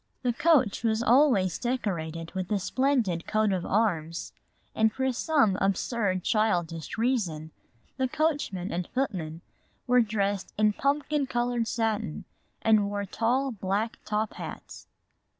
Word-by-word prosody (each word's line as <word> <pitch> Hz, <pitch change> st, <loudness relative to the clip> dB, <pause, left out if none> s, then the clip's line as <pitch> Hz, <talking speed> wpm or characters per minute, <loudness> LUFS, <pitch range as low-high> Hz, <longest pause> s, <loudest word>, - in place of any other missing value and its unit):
The 245 Hz, -1 st, +1 dB
coach 260 Hz, -7 st, +3 dB
was 225 Hz, 0 st, +1 dB
always 240 Hz, -, +4 dB
decorated 170 Hz, -10 st, -3 dB
with 185 Hz, +1 st, -4 dB
a 210 Hz, -, +3 dB
splendid 220 Hz, -5 st, 0 dB
coat 215 Hz, -2 st, +2 dB
of 180 Hz, -2 st, -2 dB
arms, 170 Hz, -6 st, 0 dB, 0.4 s
and 220 Hz, 0 st, +3 dB
for 265 Hz, +2 st, 0 dB
some 245 Hz, -7 st, +2 dB
absurd 195 Hz, -1 st, 0 dB
childish 175 Hz, -8 st, 0 dB
reason 190 Hz, -11 st, -1 dB, 0.5 s
the 260 Hz, -1 st, +1 dB
coachman 285 Hz, -, -1 dB
and 175 Hz, 0 st, -2 dB
footmen 170 Hz, -11 st, -2 dB, 0.4 s
were 250 Hz, -1 st, +5 dB
dressed 200 Hz, -3 st, -1 dB
in 215 Hz, 0 st, +3 dB
pumpkin 285 Hz, +2 st, 0 dB
colored 240 Hz, -2 st, 0 dB
satin 220 Hz, -7 st, -2 dB, 0.4 s
and 215 Hz, -2 st, +4 dB
wore 205 Hz, 0 st, -2 dB
tall 245 Hz, +7 st, 0 dB
black 205 Hz, +1 st, -2 dB
top 215 Hz, 0 st, -1 dB
hats. -, -, -9 dB
215 Hz, 130 wpm, -28 LUFS, 185-245 Hz, 0.5 s, were